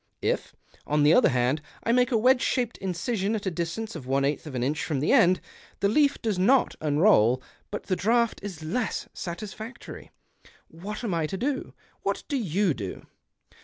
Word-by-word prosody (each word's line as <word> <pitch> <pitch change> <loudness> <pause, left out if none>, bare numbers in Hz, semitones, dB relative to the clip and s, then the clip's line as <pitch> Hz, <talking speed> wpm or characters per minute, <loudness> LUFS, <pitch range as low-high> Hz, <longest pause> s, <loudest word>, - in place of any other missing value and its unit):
If, - - -1 0.3
on 150 0 +2
the 150 +2 +6
other 250 - +6
hand, 125 +4 +1 0.2
I 230 - +1
make 250 +2 +3
a 230 - +3
wedge 250 +3 +4
shaped 245 -2 0
incision, 195 +3 -1
at 205 - -4
a 190 - 0
distance 175 +7 -4
of 140 -6 -8
one 135 +1 +2
eighth 145 +2 -2
of 140 - -7
an 120 - -1
inch 145 +4 -1
from 150 -5 -1
the 145 - +1
end, 180 +1 +5 0.4
the 200 - +2
leaf 285 +6 +3
does 215 -5 0
not 255 +8 +4
unroll, 145 - +4 0.3
but 205 - -5
the 185 - -1
draught 235 +4 +1
is 185 -6 -7
less 205 +9 -2
satisfactory. 210 +7 -7 0.6
"What 200 +8 -7
am 210 -6 -1
I 165 -2 0
to 190 - -4
do? 265 +5 -3 0.3
What - - -2
do 290 - -2
you 195 - +1
do 100 -7 -7
190 Hz, 190 wpm, -26 LUFS, 155-225 Hz, 0.6 s, the